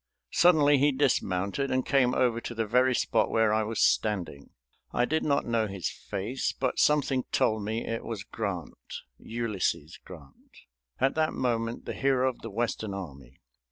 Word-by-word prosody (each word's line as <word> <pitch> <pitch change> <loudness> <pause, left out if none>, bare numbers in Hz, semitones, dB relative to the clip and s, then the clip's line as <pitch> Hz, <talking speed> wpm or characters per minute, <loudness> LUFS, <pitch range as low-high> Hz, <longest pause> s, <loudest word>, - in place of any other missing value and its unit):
Suddenly 150 -5 +5
he 145 +2 +4
dismounted 130 -3 0
and 130 0 0
came 130 -3 +2
over 120 -2 +1
to 120 - -6
the 115 0 -1
very 125 +4 +3
spot 110 -2 +1
where 110 -1 +2
I 110 - +2
was 110 +1 -3
standing. 90 -10 0 0.4
I 120 - +1
did 160 +4 0
not 140 -1 +1
know 115 -2 0
his 95 -3 -4
face, 115 +8 -3
but 130 -1 -2
something 140 -3 +2
told 110 -1 +1
me 110 +3 -3
it 115 0 -3
was 110 -4 -5
Grant, 90 - -6 0.2
Ulysses 105 -9 -3
Grant, 75 -7 -15 0.4
at 135 +1 +2
that 155 0 0
moment 115 -2 -2
the - - -4
hero 135 -1 +2
of 130 - -3
the 115 - -6
Western 110 -2 -2
army. 70 -9 -10
115 Hz, 165 wpm, -28 LUFS, 100-130 Hz, 0.4 s, Suddenly